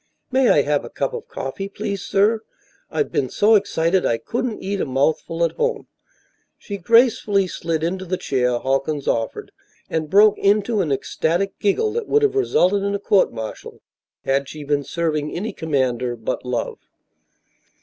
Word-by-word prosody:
"May 260 -1 +3
I 145 - +5
have 145 0 0
a - - -8
cup 140 - -2
of - - -6
coffee, 195 +9 -5
please, 200 -1 -4
sir? 215 +3 +2 0.5
I've 440 - -1
been 130 - 0
so 215 +2 +3
excited 190 -3 +2
I 115 - +1
couldn't 230 - -3
eat 195 +1 -2
a - - 0
mouthful 155 +5 0
at 165 - +2
home." 470 -2 -1 0.7
She 200 - -6
gracefully 215 -1 +3
slid 165 -3 -3
into 185 +3 -2
the 185 +1 -2
chair 125 -5 0
Halkins 135 +3 -1
offered, 115 -1 -2 0.4
and 160 -2 -1
broke 210 +2 +5
into 205 +2 +2
an 160 -6 -1
ecstatic 170 +7 -1
giggle 415 - +1
that 460 -2 -3
would 435 +1 +3
have 420 -1 +3
resulted 205 - +2
in 200 0 -1
a - - -2
court 200 -1 +3
martial 110 -1 -8 0.4
had 135 0 0
she 155 -1 -8
been 145 0 0
serving 150 0 -2
any 210 +6 -3
commander 130 -6 -1
but 110 -2 -4
Love. 125 -2 -3
180 Hz, 170 wpm, -21 LUFS, 140-205 Hz, 0.7 s, I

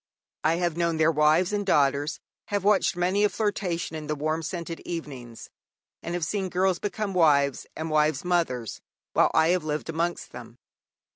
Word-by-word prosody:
I 160 +2 +3
have 170 -2 -1
known 170 -1 +1
their 160 +1 +4
wives 155 +5 +3
and 205 0 0
daughters; 145 -4 +1 0.3
have 205 -2 -1
watched 205 -3 +3
many 185 +3 +1
a 210 - +4
flirtation 195 -7 -2
in 155 -1 -6
the 150 - -1
warm 155 +2 -1
scented 170 +1 -5
evenings; 135 -9 -7 0.5
and 170 - -4
have 175 -2 -1
seen 190 +3 -2
girls 185 0 +1
become 205 -1 -3
wives 140 -6 +3
and 160 0 -4
wives 150 0 +2
mothers 145 - -1 0.3
while - - +4
I 160 - +4
have 180 -2 +2
lived 155 +1 -3
amongst 170 +2 -2
them. 120 -1 -11
165 Hz, 170 wpm, -26 LUFS, 150-180 Hz, 0.5 s, their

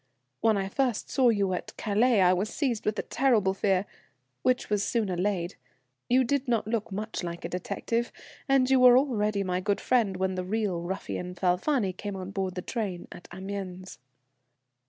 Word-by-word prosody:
When 220 -2 +3
I 195 -1 -1
first 245 +2 -1
saw 260 -3 +4
you 200 -4 +1
at 180 - -5
Calais 220 +1 +3
I 180 0 +5
was 190 +4 -1
seized 245 -8 -2
with 215 - 0
a - - -1
terrible 230 -8 +2
fear, 195 -1 +1 0.6
which 255 0 +1
was 210 -1 +1
soon 215 0 0
allayed; 180 0 -1 0.5
you 255 +2 +5
did 275 +2 0
not 230 -4 +1
look 220 -2 -2
much 215 +1 -4
like 170 -1 -5
a - - -3
detective, 230 +6 -2 0.4
and 270 -2 +4
you 265 0 +4
were 250 -1 +8
already 215 -7 +1
my 180 -1 -1
good 205 +1 0
friend 220 -7 +1
when 190 0 0
the 185 0 -3
real 195 -3 -1
ruffian, 180 0 -4
Falfani, 190 +4 +1
came 200 +2 -6
on 190 0 -6
board 190 -2 -3
the 180 - -4
train 200 -7 -4
at 175 - -11
Amiens." 190 0 -6
200 Hz, 180 wpm, -28 LUFS, 185-235 Hz, 0.6 s, were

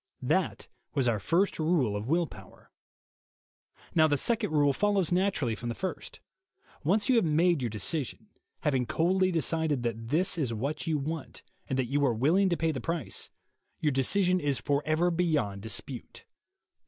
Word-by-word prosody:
That - - 0 0.3
was 135 -3 +2
our 115 -3 +1
first 170 - +1
rule 155 -10 +1
of 105 +2 -4
will 170 +4 +2
power. - - -15 1.2
Now 155 -1 +5
the 145 -2 +1
second 225 - 0
rule 145 -2 +3
follows 200 -1 +1
naturally 180 - +1
from 120 +2 -5
the 115 - -3
first. 340 - -5 0.6
Once 205 +8 +2
you 255 -3 +4
have 230 - +4
made 165 0 +2
your 120 - -1
decision, 130 - -1 0.3
having 135 -5 +1
coldly 185 +3 +2
decided 160 -5 0
that 115 -1 -3
that 170 +6 +2
is 125 -6 -1
what 140 +9 -3
you 160 -2 +1
want 155 +1 -5 0.3
and 130 - -1
that 130 - +1
you 145 +3 0
are 125 -4 +2
willing 170 - +3
to 170 - 0
pay 165 0 +1
the 135 -5 -4
price, 165 -3 -3 0.5
your 150 - +1
decision 180 +8 +2
is 145 -5 0
forever 155 +4 +1
beyond 155 - 0
dispute. 110 -1 -6
155 Hz, 165 wpm, -29 LUFS, 130-175 Hz, 1.2 s, Now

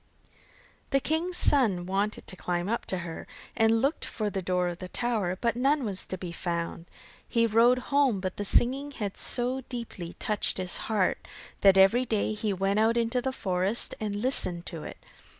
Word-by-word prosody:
The 275 - +3
king's 330 +6 -1
son 210 -11 +3
wanted 200 +3 -1
to - - -6
climb 175 0 -2
up 230 +3 -2
to 190 - -1
her, 165 -1 -7 0.3
and 225 +1 +3
looked 285 +4 0
for 210 -2 -3
the 195 - -2
door 180 0 0
of 175 0 -7
the 185 - -6
tower, 210 -7 -1
but 235 -1 0
none 275 +3 +2
was 195 -3 -2
to 185 - -4
be 180 -2 -6
found. 170 0 -4 0.4
He 230 -1 +3
rode 230 +3 +5 0.2
home, 275 -8 +3
but 185 -1 -4
the 205 - -2
singing 265 +7 +2
had 205 -6 -4
so 250 +2 0
deeply 225 -8 -5
touched 210 -2 0
his 185 -1 -2
heart, 205 -4 0 0.3
that 195 -1 +6
every 195 +7 +5
day 215 -2 0
he 210 0 -2
went 195 +2 0
out 225 +2 +3
into 235 +1 +1
the 265 +2 -1
forest 190 -2 -1
and 210 -2 -3
listened 205 -7 0
to 165 -3 -4
it. - - -8
210 Hz, 185 wpm, -28 LUFS, 185-245 Hz, 0.4 s, that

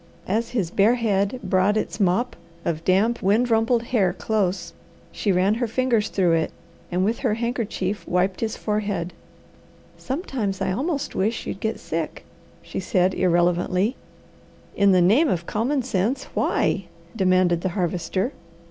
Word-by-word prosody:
As 225 +4 0
his 200 -9 -1
bare 210 +6 +4
head 210 0 0
brought 190 +2 +2
its 195 -2 -3
mop 200 +6 +1 0.3
of 160 -1 -2
damp 210 +7 +2
wind 220 +6 +2
rumpled 225 +1 +3
hair 210 -7 +1
close, 185 -5 -1 0.4
she 205 - 0
ran 185 +3 +3
her 235 +2 -1
fingers 230 -2 +1
through 180 -3 +2
it, 165 -1 +1 0.4
and 180 +2 +1
with 225 +3 0
her 235 -6 +1
handkerchief 225 -4 -2
wiped 185 +1 +1
his 225 -1 -2
forehead. 205 -5 -2 0.9
"Sometimes 255 - -3
I 190 -1 0
almost 285 - -2
wish 220 +4 -1
you'd - - -5
get 220 +1 -2
sick," 160 -1 -4 0.4
she - - -5
said 185 0 +1
irrelevantly. 180 +5 +2 0.8
"In 200 0 +4
the 180 -2 +5
name 235 - +5
of 170 -4 -1
common 255 +8 0
sense, 235 +3 0
why?" - - +1 0.3
demanded 185 -4 +3
the 190 - 0
Harvester. 180 - -1
200 Hz, 150 wpm, -23 LUFS, 185-230 Hz, 0.9 s, the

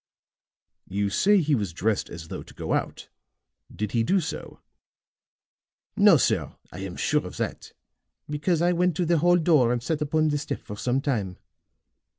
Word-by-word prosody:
"You 100 +1 -1
say 205 - +4
he 155 -1 +1
was 100 -10 -1
dressed 105 +4 -1
as 80 -1 -9
though - - -5
to - - -14
go - - -3
out. - - -3 0.6
Did 105 -1 -4
he 115 - +1
do 190 +12 +2
so?" 160 -2 -6 1.4
"No, - - +6
sir. - - 0 0.2
I 90 - -9
am 95 -2 -6
sure - - +1
of - - -10
that, - - -4 0.5
because 155 +3 0
I 175 - +3
went 180 -1 +1
to 175 - 0
the 170 -1 +2
hall 175 +2 +4
door 155 -8 +3
and 120 -1 -1
sat 155 +3 -2
upon 155 +1 +1
the 145 0 0
step 140 - -5
for 105 - -7
some 125 +5 0
time. 105 -10 -2
145 Hz, 175 wpm, -25 LUFS, 105-165 Hz, 1.4 s, No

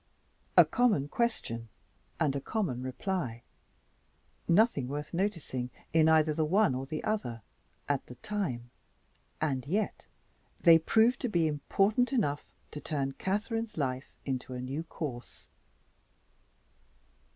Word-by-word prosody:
(A - - +10
common 225 - +2
question 115 - -1 0.5
and 145 -3 +2
a 140 - -2
common 145 - -2
reply. 130 - -3 1.0
Nothing 170 - +4
worth 145 +2 -5
noticing, 170 -10 -2 0.2
in 160 -1 +5
either 155 -1 +4
the 155 - +1
one 190 +1 +3
or 130 +1 -4
the 155 +2 -4
other, 120 - -2 0.4
at 145 -2 -1
the 125 - -10
time 125 - -3 0.7
and 135 -5 0
yet 205 +7 -1 0.5
they 165 -2 +7
proved 225 +8 +3
to 250 - -1
be 170 -5 +2
important 195 - +2
enough 165 - +1 0.3
to 150 - -6
turn 135 -2 -1
Catherine's 210 - -2
life 130 -2 -2
into 130 -1 -3
a - - -4
new 135 +5 -3
course.) 135 -7 -7
155 Hz, 125 wpm, -31 LUFS, 130-205 Hz, 1.0 s, A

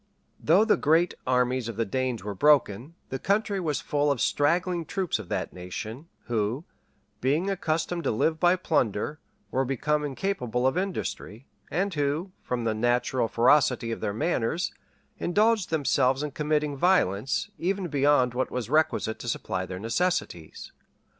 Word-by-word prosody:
Though 185 +8 +4
the 225 - +3
great 165 +4 +3
armies 125 -1 +1
of 115 - -5
the 115 +1 0
Danes 125 -1 -2
were 105 0 -4
broken, 140 - +2
the 135 - -4
country 205 0 0
was 155 -5 -1
full 145 0 +1
of 140 - -1
straggling 170 +6 +1
troops 180 - -2
of 105 - -9
that - - -3
nation, 110 - -7 0.2
who, 115 +6 -1 0.5
being 150 - +1
accustomed 170 -1 -1
to - - +2
live 160 +8 +1
by 175 0 +4
plunder, 145 - -1 0.3
were 130 - +1
become 150 +3 0
incapable 130 - -2
of 130 - +2
industry; 175 - -4 0.2
and 190 +4 -1
who, 150 +5 -1
from 125 -1 -3
the 115 -1 +1
natural 120 +2 +1
ferocity 120 0 +3
of 115 - -4
their - - -1
manners, 120 - -1 0.5
indulged 210 +2 +2
themselves 140 -3 +2
in 150 - -3
committing 150 0 0
violence, 135 - +1
even 190 +1 -1
beyond 140 -4 +3
what 130 +1 -1
was 125 -1 -4
requisite 155 -7 +1
to 120 - -5
supply 95 -4 -3
their 90 - -6
necessities. 115 - -2
140 Hz, 155 wpm, -27 LUFS, 120-170 Hz, 0.5 s, Though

